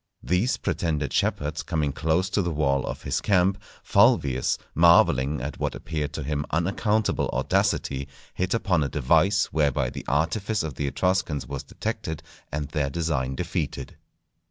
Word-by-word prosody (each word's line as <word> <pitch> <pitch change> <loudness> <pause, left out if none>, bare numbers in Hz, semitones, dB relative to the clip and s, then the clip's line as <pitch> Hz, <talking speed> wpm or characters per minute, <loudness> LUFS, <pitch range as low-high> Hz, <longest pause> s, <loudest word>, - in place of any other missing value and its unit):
These 95 +9 +1
pretended 75 -4 -2
shepherds 75 +2 0
coming 75 -4 -1
close 80 +5 0
to 100 - +2
the 85 - -1
wall 70 -4 0
of - - -5
his - - -1
camp, 95 0 +2 0.2
Fulvius, 65 -3 +3 0.2
marvelling 75 -4 +4
at 70 +2 -5
what - - -2
appeared 75 -3 -3
to 75 - -4
him 75 +1 -2
unaccountable 100 +6 0
audacity, 70 0 0 0.3
hit 95 +4 -1
upon 95 -8 +1
a 70 - -2
device 80 +9 +2
whereby 75 -4 +1
the - - -7
artifice 95 - 0
of 80 -3 -4
the 70 +2 -3
Etruscans 80 -3 0
was 70 +2 -5
detected 80 0 -5 0.3
and 75 0 -3
their 75 -3 -1
design 70 -4 -1
defeated. - - -3
80 Hz, 150 wpm, -25 LUFS, 70-90 Hz, 0.3 s, marvelling